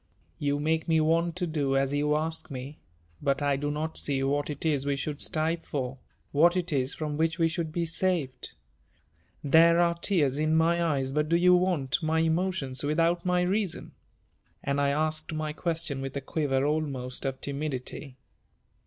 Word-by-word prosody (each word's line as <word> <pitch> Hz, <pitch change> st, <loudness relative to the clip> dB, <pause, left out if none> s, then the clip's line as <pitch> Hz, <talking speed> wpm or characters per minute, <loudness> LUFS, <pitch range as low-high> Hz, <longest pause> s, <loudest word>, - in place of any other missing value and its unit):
"You 145 Hz, 0 st, 0 dB
make 160 Hz, +2 st, 0 dB
me 160 Hz, -1 st, +3 dB
want 165 Hz, +2 st, +2 dB
to 180 Hz, -1 st, -1 dB
do 145 Hz, -5 st, 0 dB
as 135 Hz, +1 st, +1 dB
you 150 Hz, +1 st, +1 dB
ask 160 Hz, +1 st, -2 dB
me, 135 Hz, +2 st, -7 dB, 0.4 s
but 140 Hz, 0 st, 0 dB
I 140 Hz, -1 st, +2 dB
do 145 Hz, +2 st, -2 dB
not 155 Hz, +2 st, -3 dB
see 135 Hz, -2 st, 0 dB
what 145 Hz, +2 st, 0 dB
it 150 Hz, +1 st, -5 dB
is 145 Hz, -4 st, +1 dB
we 140 Hz, 0 st, 0 dB
should 145 Hz, +1 st, -4 dB
strive 165 Hz, 0 st, -1 dB
for, 130 Hz, -3 st, -4 dB, 0.3 s
what 170 Hz, +5 st, +4 dB
it 180 Hz, -2 st, -1 dB
is 130 Hz, -1 st, 0 dB
from 150 Hz, -2 st, -3 dB
which 160 Hz, +1 st, +1 dB
we 165 Hz, -2 st, +3 dB
should 160 Hz, 0 st, -3 dB
be 170 Hz, +1 st, -1 dB
saved. 165 Hz, -6 st, -1 dB, 0.9 s
There 165 Hz, +4 st, +6 dB
are 170 Hz, 0 st, +3 dB
tears 160 Hz, -6 st, +1 dB
in 155 Hz, +1 st, +2 dB
my 170 Hz, +1 st, +3 dB
eyes 135 Hz, -5 st, 0 dB
but 150 Hz, +2 st, 0 dB
do 170 Hz, -, +3 dB
you 180 Hz, +1 st, +6 dB
want 175 Hz, -8 st, +1 dB
my 160 Hz, 0 st, 0 dB
emotions 160 Hz, -5 st, -1 dB
without 165 Hz, +3 st, +1 dB
my 180 Hz, 0 st, +2 dB
reason?" 190 Hz, 0 st, -1 dB, 0.7 s
And 140 Hz, +1 st, 0 dB
I 140 Hz, -, +2 dB
asked 155 Hz, +3 st, 0 dB
my 155 Hz, -1 st, -3 dB
question 160 Hz, -4 st, -2 dB
with 135 Hz, +1 st, -4 dB
a -, -, -3 dB
quiver 135 Hz, -1 st, 0 dB
almost 140 Hz, -5 st, -2 dB
of 135 Hz, -1 st, -3 dB
timidity. 140 Hz, -2 st, -4 dB
155 Hz, 180 wpm, -28 LUFS, 140-165 Hz, 0.9 s, There